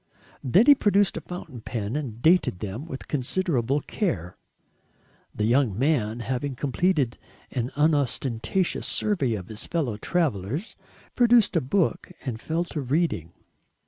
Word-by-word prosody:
Then 180 - +4
he 290 - +9
produced 205 -6 +2
a - - -4
fountain 160 -9 -8
pen 110 0 -4
and 120 -6 -5
dated 170 - +4
them 105 - -6
with 135 -5 -7
considerable 140 -2 0
care. 115 - -3 1.0
The 105 - -1
young 115 -2 +2
man, 120 -5 +1
having 130 +3 -3
completed 140 -1 0 0.3
an 125 -2 -2
unostentatious 145 +2 +1
survey 145 - +2
of 90 -3 -7
his 110 -1 -2
fellow 140 -11 -1
travellers, 145 - -2 0.4
produced 240 -4 +4
a 165 - +3
book 175 +6 0
and 120 -4 -4
fell 165 +2 -1
to 150 - -2
reading. 135 - -1
140 Hz, 135 wpm, -25 LUFS, 115-170 Hz, 1.0 s, he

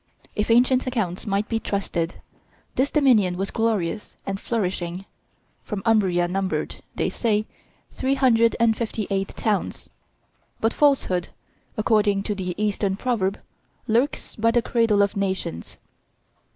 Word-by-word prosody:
If 210 +1 -1
ancient 250 +3 +4
accounts 215 -7 -2
might 200 +2 0
be 225 -2 -1
trusted, 185 -5 -2 0.6
this 270 +2 +1
dominion 225 - +3
was 195 +1 -2
glorious 215 -3 -1
and 195 0 -3
flourishing, 185 -5 -2 0.6
for 210 - -4
Umbria 190 -6 +3
numbered, 190 +1 -2 0.2
they - - 0
say, 215 -2 0 0.5
three 265 +1 0
hundred 230 -4 +4
and 230 -1 +4
fifty 220 -2 -3
eight 195 0 0
towns; 210 -3 -2 0.7
but 225 +1 +1
falsehood, 265 - +2 0.5
according 210 -2 +2
to 210 - -2
the 180 -3 -4
Eastern 205 -2 0
proverb, 205 -4 -1 0.5
lurks 240 +6 0
by 230 +1 +2
the 235 0 +2
cradle 225 -4 +3
of 200 +2 -1
nations. 190 - -3
210 Hz, 130 wpm, -24 LUFS, 195-230 Hz, 0.7 s, ancient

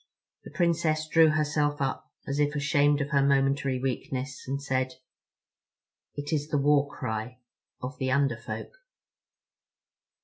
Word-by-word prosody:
The - - -10
Princess 160 -3 +1
drew 160 0 +6
herself 150 -1 +1
up, 135 -1 -3
as 140 +1 -2
if 145 0 +1
ashamed 145 0 +3
of 140 +1 -3
her 140 -2 +4
momentary 135 -1 +2
weakness, 130 +1 -4
and 135 +1 -2
said: 130 -2 -1 1.2
"It 145 +1 -4
is 145 -1 0
the 150 - 0
war 145 0 +3
cry 110 -1 -4 0.5
of 130 +3 -5
the 130 -1 0
Under 135 -2 +2
Folk." - - -6
140 Hz, 135 wpm, -28 LUFS, 135-150 Hz, 1.2 s, drew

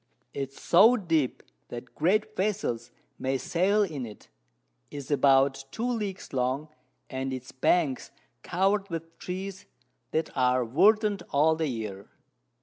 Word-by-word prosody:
It 135 -1 -3
is - - -15
so 225 +8 +6
deep, 165 - 0 0.3
that 120 +1 -8
great 215 +7 +1
Vessels 185 - -1 0.3
may 135 +1 0
sail 185 - +2
in 155 -9 -4
it, 110 -3 -10 0.6
is 140 0 -7
about 135 -1 +4
2 225 - -4
Leagues 210 -9 -3
long, 130 +4 -1 0.4
and 130 0 -3
its 130 0 -6
Banks 140 0 +1 0.3
cover'd 195 +3 +1
with 165 0 -6
Trees 190 +1 -6 0.4
that 160 +4 -2
are 125 -1 +2
verdant 205 - +3
all 155 +3 +3
the 160 -1 -1
Year. 105 -6 -5
155 Hz, 135 wpm, -28 LUFS, 130-195 Hz, 0.6 s, so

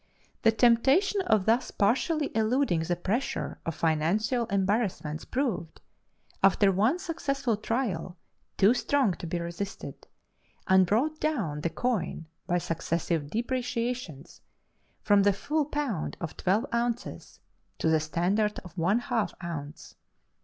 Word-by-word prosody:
The 225 - +5
temptation 265 - +3
of 215 -4 +3
thus 230 +3 +2
partially 275 - +1
eluding 225 -4 +2
the 170 +2 -1
pressure 205 +9 -2
of 165 - -2
financial 195 +10 +1
embarrassments 195 -6 -1
proved, 240 - -2 0.6
after 195 +1 +5
one 215 - +2
successful 275 - -1
trial, 205 -6 -2 0.4
too 200 +5 +6
strong 255 -4 +1
to 170 - -7
be 170 +1 -2
resisted, 170 +4 -6 0.6
and 190 -1 +5
brought 290 - +1
down 215 - -1
the 170 - 0
coin 205 -2 -2 0.2
by 175 -1 +2
successive 165 -2 -2
depreciations 240 - -3 0.6
from 205 -1 +5
the 200 0 +4
full 300 +9 -1
pound 280 - -3
of 170 -3 -5
twelve 195 +5 +1
ounces 235 0 -3 0.4
to - - -1
the 160 0 +4
standard 185 +7 0
of 175 - -12
one 185 +7 +3
half 240 -2 -1
ounce. 150 -3 -7
210 Hz, 125 wpm, -28 LUFS, 170-245 Hz, 0.6 s, too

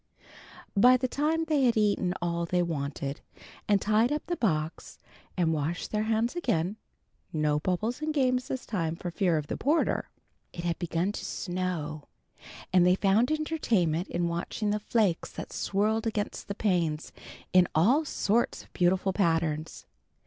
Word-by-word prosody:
By 250 +5 +7
the 255 +1 -1
time 310 +5 0
they 300 -4 +2
had 235 -2 +3
eaten 200 -4 +1
all 170 0 -1
they 180 +1 +1
wanted, 140 -3 -3 0.5
and 205 -1 +4
tied 215 +5 +2
up 300 0 -2
the 345 - -2
box 160 - -2 0.4
and 165 -3 +2
washed 155 +3 -2
their 210 - 0
hands 225 +4 0
again 210 - 0 0.5
(no 150 -1 +1
bubbles 210 - -1
and 310 0 -1
games 255 -3 +1
this 260 -2 -4
time 165 -6 -2
for 175 +1 -5
fear 175 -1 +1
of 150 - -2
the - - -4
porter) 305 +4 +1 0.4
it 170 - -6
had 170 -1 -1
begun 175 +2 -1
to - - -6
snow, 175 -5 -3 0.7
and 180 -1 +6
they 180 +1 +5
found 205 +5 +3
entertainment 230 - 0
in 175 0 -1
watching 175 +5 -2
the 210 - 0
flakes 210 -5 0
that - - -7
swirled 215 +3 0
against 210 -2 -3
the 200 - -4
panes 170 -7 0 0.4
in 180 -1 +6
all 240 - +4
sorts 235 -5 0
of - - -24
beautiful 185 +1 +2
patterns. 165 -4 0
190 Hz, 160 wpm, -28 LUFS, 170-230 Hz, 0.7 s, By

